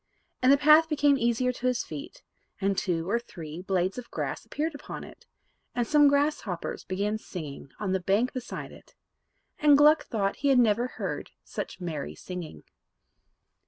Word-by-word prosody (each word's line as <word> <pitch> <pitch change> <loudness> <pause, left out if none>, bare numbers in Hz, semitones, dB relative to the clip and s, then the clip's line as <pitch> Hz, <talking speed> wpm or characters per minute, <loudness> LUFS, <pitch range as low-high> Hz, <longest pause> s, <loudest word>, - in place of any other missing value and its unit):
And 255 +1 +6
the 280 - +7
path 305 +3 +6
became 290 -2 +4
easier 245 0 +1
to 250 +1 -3
his 250 -1 +1
feet, 150 -3 -9 0.4
and 195 0 +1
two 175 -4 -1
or 235 +4 +1
three 170 -8 -9
blades 190 +2 0
of 240 - -10
grass - - -4
appeared 315 +2 -3
upon 285 - -8
it, - - -14 0.5
and 240 - +1
some 295 +3 +5
grasshoppers 280 - 0
began 205 +3 -2
singing 150 -9 -8
on 205 -3 -2
the 190 - +1
bank 200 +7 +1
beside 255 -1 -6
it; - - -16 0.6
and 295 -1 +6
Gluck 300 +2 +6
thought 200 -4 -1
he 285 - -1
had 270 -2 +5
never 235 0 +3
heard - - -5
such - - -6
merry 160 -6 -4
singing. 175 - -8
230 Hz, 165 wpm, -28 LUFS, 185-280 Hz, 0.6 s, the